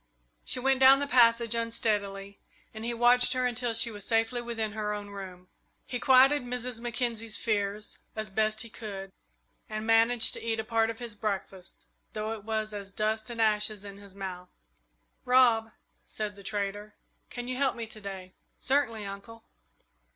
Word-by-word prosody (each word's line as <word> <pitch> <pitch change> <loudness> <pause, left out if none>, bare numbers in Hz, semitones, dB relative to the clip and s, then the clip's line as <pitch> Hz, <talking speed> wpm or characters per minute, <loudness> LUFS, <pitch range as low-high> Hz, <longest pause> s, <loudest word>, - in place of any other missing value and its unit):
She - - -1
went 265 +1 +2
down 265 +1 +8
the 285 - -1
passage 235 -3 +4
unsteadily, 205 -4 -2 0.3
and 220 0 -8
he 235 - -2
watched 240 +1 +7
her 255 0 0
until 245 -1 -1
she 230 +1 +2
was 205 -2 -8
safely 225 +2 0
within 225 -2 -3
her 210 -1 -3
own 205 -1 -8
room. 185 -2 -9 0.4
He 245 - -4
quieted 270 +3 +5
Mrs. 245 -1 -4
Mackenzie's 230 -2 -2
fears 210 -1 -2 0.2
as 215 -2 -4
best 215 +1 0
he 230 - -6
could, 195 -4 -7 0.6
and 215 0 -4
managed 225 +1 +4
to - - -5
eat 225 -1 -2
a - - -1
part 225 0 +1
of 225 - -5
his 235 -2 -8
breakfast, 195 -3 -5 0.3
though 215 0 -3
it 220 -2 -6
was 215 0 -3
as 200 -1 -7
dust 215 +2 -2
and 235 -1 -7
ashes 210 -2 +1
in 200 -1 -9
his 200 -1 -14
mouth. 180 -2 -7 0.7
"Rob," 245 -3 +4 0.4
said 210 -1 -4
the 200 - -13
trader, 205 +1 -4 0.3
"can 245 0 -7
you 255 0 -3
help 275 0 +1
me 230 - -5
to 220 -1 -10
day?" 190 -2 -8 0.2
"Certainly, 245 -6 0
Uncle." 200 +3 -9
220 Hz, 175 wpm, -28 LUFS, 205-240 Hz, 0.7 s, down